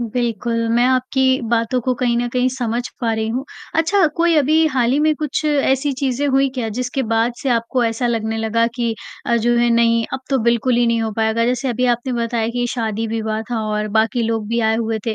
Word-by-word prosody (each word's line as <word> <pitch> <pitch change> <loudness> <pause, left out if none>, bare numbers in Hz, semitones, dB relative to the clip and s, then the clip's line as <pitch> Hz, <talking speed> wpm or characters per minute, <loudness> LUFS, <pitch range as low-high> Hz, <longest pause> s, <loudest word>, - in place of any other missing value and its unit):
बिल्कुल, 235 -1 -2
मैं 235 +2 +3
आपकी 260 +1 +2
बातों 235 +2 +1
को 255 +2 0
कहीं 240 -2 +1
न 240 0 -1
कहीं 250 +1 +1
समझ 245 -2 -2 0.2
पा 230 -2 0
रही 220 0 -2
हूँ, 250 +4 -2 0.3
अच्छा 330 +3 +3
कोई 335 0 +3
अभी 310 +2 +3
हाल 255 -5 +1
ही 280 - +2
में 310 0 +3
कुछ 300 0 -2
ऐसी 285 -1 +1
चीज़ें 275 +1 0
हुई 270 0 +3
क्या, 245 -4 -2
जिसके 250 +4 -2
बाद 225 +1 +1
से 275 - -1
आपको 235 +1 +1
ऐसा 230 +2 -1
लगने 225 -1 -1
लगा 225 +1 +1
कि 235 -2 -1 0.3
अ, 235 - +2
जो 240 +1 +1
है 240 0 +3
नहीं, 230 0 +3
अब - - -3
तो 270 - +2
बिल्कुल 235 +1 +2
ही 240 0 +3
नहीं 230 0 +1
हो 220 - -2
पाएगा? 225 +1 +1
जैसे 250 +2 0
अभी 250 +1 -1
आपने 245 +2 -5
बताया 230 -1 -1
कि 245 0 0
शादी-विवाह 220 -1 -2
था 230 -2 -1
और 210 0 -1
बाकी 225 +2 +1
लोग 225 -1 -1
भी 235 +1 0
आए 220 0 +2
हुए 225 -1 -1
थे, 225 - 0
235 Hz, 220 wpm, -19 LUFS, 225-255 Hz, 0.3 s, मैं